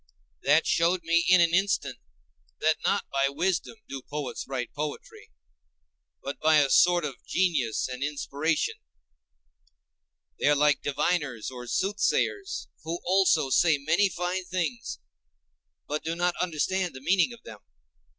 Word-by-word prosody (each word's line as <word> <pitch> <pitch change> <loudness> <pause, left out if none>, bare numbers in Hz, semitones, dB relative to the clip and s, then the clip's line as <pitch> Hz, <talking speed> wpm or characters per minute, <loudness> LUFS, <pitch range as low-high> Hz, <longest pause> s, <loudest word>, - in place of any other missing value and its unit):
That 150 +3 +3
showed 170 +1 +2
me 170 +1 +2
in 185 -1 +7
an 170 -1 +3
instant 180 -8 +1 0.6
that 155 0 +2
not 200 - +1
by 140 0 +2
wisdom 180 +9 -1
do 135 -1 -6
poets 145 0 -6
write 125 -3 -4
poetry, 150 0 -6 0.9
but 140 - -5
by 155 0 +4
a 140 -2 +3
sort 175 -2 +4
of 135 -4 -7
genius 155 -12 0
and 125 +1 -5
inspiration; 150 +2 -1 1.6
they - - +1
are 145 - +5
like 150 -1 +3
diviners 145 -5 -1
or 125 -1 -9
soothsayers 205 - -1
who 165 +2 -4
also 180 -7 +3
say 150 +4 +4
many 160 +8 +2
fine 180 +1 -3
things, 185 - -3 0.9
but 150 +1 -3
do 165 +1 -2
not 175 0 0
understand 180 0 -1
the 130 - -9
meaning 185 - +2
of 235 -1 -13
them. 105 - -11
160 Hz, 140 wpm, -27 LUFS, 140-180 Hz, 1.6 s, in